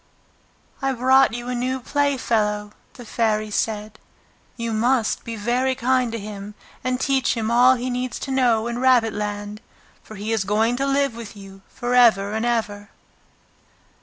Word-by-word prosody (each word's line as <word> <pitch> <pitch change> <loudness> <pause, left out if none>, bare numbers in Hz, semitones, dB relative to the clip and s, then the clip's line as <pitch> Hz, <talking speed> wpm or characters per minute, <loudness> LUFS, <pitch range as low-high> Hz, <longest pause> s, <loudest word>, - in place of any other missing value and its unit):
"I've 270 -2 -1
brought 260 +2 +5
you 240 0 -6
a 250 - -2
new 255 +2 -2
playfellow," 230 -7 0 0.2
the 245 - -12
Fairy 215 -2 -1
said. 215 0 -2 0.6
"You 230 -1 -3
must 235 +1 +1
be 230 - -6
very 245 +5 0
kind 255 -1 +1
to 230 - -3
him 205 -1 -8 0.3
and 255 0 -1
teach 265 -2 +1
him 225 0 -1
all 250 +2 +6
he 250 +1 -3
needs 250 -2 -3
to 270 - -4
know 240 -4 +2
in 235 0 -3
Rabbit 250 -4 +3
land, 205 0 -5 0.4
for 215 - -12
he 210 +2 -4
is 220 -3 +1
going 220 +4 +1
to 275 +1 -1
live 275 -3 +1
with 230 -3 -9
you 195 -1 -12
for 245 0 -4
ever 215 -5 +4
and 220 +2 -1
ever!" 205 -4 -2
235 Hz, 165 wpm, -22 LUFS, 210-255 Hz, 0.6 s, all